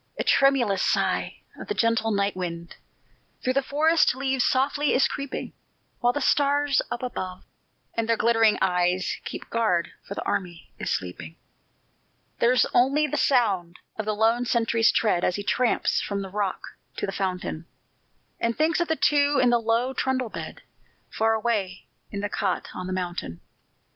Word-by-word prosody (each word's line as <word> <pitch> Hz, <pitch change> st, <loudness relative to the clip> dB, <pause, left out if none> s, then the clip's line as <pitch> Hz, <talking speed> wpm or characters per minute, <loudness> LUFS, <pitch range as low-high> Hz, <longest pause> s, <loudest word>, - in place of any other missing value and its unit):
A -, -, -1 dB
tremulous 245 Hz, -8 st, +3 dB
sigh -, -, 0 dB, 0.2 s
of -, -, -8 dB
the 420 Hz, -, -2 dB
gentle 230 Hz, -1 st, +1 dB
night 200 Hz, -2 st, 0 dB
wind 170 Hz, -2 st, -5 dB, 0.7 s
Through 255 Hz, -, +1 dB
the 275 Hz, -, +2 dB
forest 305 Hz, +1 st, +2 dB
leaves 265 Hz, -1 st, 0 dB
softly 285 Hz, +3 st, +1 dB
is 255 Hz, -, +4 dB
creeping, 280 Hz, -2 st, -5 dB, 0.5 s
While 240 Hz, -1 st, +3 dB
the 290 Hz, -, -2 dB
stars 285 Hz, -1 st, +2 dB
up 240 Hz, -, -4 dB
above, 185 Hz, -7 st, -5 dB, 0.5 s
with 230 Hz, -1 st, -1 dB
their 230 Hz, -1 st, +2 dB
glittering 225 Hz, -1 st, +3 dB
eyes, 180 Hz, 0 st, +1 dB
Keep -, -, -7 dB
guard, 215 Hz, -7 st, +1 dB
for 200 Hz, -, -8 dB
the -, -, -4 dB
army 175 Hz, -3 st, -4 dB
is -, -, -3 dB
sleeping. 90 Hz, -3 st, -4 dB, 1.0 s
There's 245 Hz, +1 st, +4 dB
only 275 Hz, +5 st, +3 dB
the 295 Hz, -, -3 dB
sound 195 Hz, -10 st, +1 dB, 0.2 s
of 220 Hz, -, -4 dB
the 215 Hz, 0 st, -1 dB
lone 225 Hz, +3 st, +2 dB
sentry's 230 Hz, -1 st, +2 dB
tread 195 Hz, -6 st, +1 dB
As 180 Hz, -, +1 dB
he 205 Hz, -, -4 dB
tramps 215 Hz, +5 st, +1 dB
from 200 Hz, -1 st, -3 dB
the 190 Hz, -, -7 dB
rock 200 Hz, -2 st, -2 dB, 0.4 s
to -, -, -1 dB
the 195 Hz, -, -4 dB
fountain, 180 Hz, -4 st, -3 dB, 0.7 s
And 230 Hz, 0 st, -1 dB
thinks 315 Hz, +3 st, +2 dB
of 345 Hz, -, 0 dB
the 320 Hz, -, +1 dB
two 290 Hz, -1 st, +3 dB
in 245 Hz, -1 st, +4 dB
the 240 Hz, -1 st, +3 dB
low 230 Hz, +3 st, +1 dB
trundle 260 Hz, -2 st, -1 dB
bed -, -, -8 dB, 0.5 s
Far 225 Hz, 0 st, +1 dB
away 210 Hz, -5 st, -2 dB, 0.2 s
in 200 Hz, -, -5 dB
the 205 Hz, -, -1 dB
cot 195 Hz, -2 st, -2 dB
on 185 Hz, -, -6 dB
the -, -, -4 dB
mountain. 175 Hz, -, -4 dB
225 Hz, 170 wpm, -25 LUFS, 190-260 Hz, 1.0 s, is